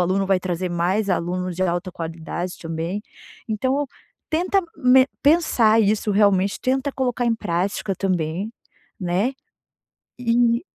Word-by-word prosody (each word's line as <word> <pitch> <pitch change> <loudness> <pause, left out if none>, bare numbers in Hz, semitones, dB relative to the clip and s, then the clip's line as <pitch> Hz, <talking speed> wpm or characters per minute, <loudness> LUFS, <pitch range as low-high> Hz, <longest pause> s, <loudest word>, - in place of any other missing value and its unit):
aluno 190 +2 +1
vai 190 -1 +3
trazer 180 0 -2
mais 180 +5 0
alunos 180 0 -1
de 185 - 0
alta 175 +1 -1
qualidade 170 +1 -5
também. 165 +5 -3 0.5
Então 260 +6 0 0.4
tenta 360 +5 +2 0.2
me 260 -1 +5 0.2
pensar 260 -8 +4
isso 210 0 +1
realmente, 200 -1 +3
tenta 265 +2 0
colocar 250 -2 -1
em 230 - +3
prática 195 +1 -2
também, 185 +2 -1 0.5
né. 185 +8 0 0.9
E 235 0 +2
195 Hz, 125 wpm, -22 LUFS, 180-245 Hz, 0.9 s, me